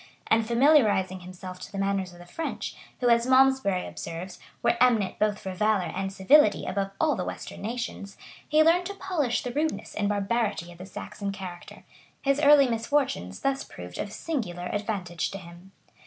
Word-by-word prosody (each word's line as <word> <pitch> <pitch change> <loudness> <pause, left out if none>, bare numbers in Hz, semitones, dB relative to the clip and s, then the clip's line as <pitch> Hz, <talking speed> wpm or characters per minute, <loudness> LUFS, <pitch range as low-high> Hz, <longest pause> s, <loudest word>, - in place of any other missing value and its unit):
And 225 0 +2
familiarizing 225 -8 +4
himself 185 0 -9
to - - -9
the 200 - -6
manners 195 -2 -1
of 175 - -14
the 175 - -12
French, 320 - -5 0.3
who, 245 - +3
as 235 +1 +4
Malmsbury 260 -8 +4
observes,[] 175 +3 -7 0.2
were 235 0 +3
eminent 230 -6 +3
both 210 -1 +2
for 190 -2 -6
valor 195 -4 +1
and 195 0 -2
civility 205 +6 +4
above 195 0 -1
all 315 - +3
the - - -2
western - - -7
nations, 225 -3 -5 0.3
he 310 +1 +5
learned 345 +3 +3
to 400 - -6
polish 320 -11 -1
the 250 - -3
rudeness 310 +3 -2
and 205 -1 0
barbarity 205 -3 -1
of 170 - -15
the 185 - -8
Saxon 200 +1 -5
character: 185 -3 -9 0.4
his 275 0 +2
early 285 -2 +7
misfortunes 230 - -1
thus 275 0 0
proved 90 0 -10
of 205 - -3
singular 180 - -4
advantage 200 -5 -2
to 195 - -6
him. 175 +1 -13
205 Hz, 175 wpm, -27 LUFS, 185-260 Hz, 0.4 s, early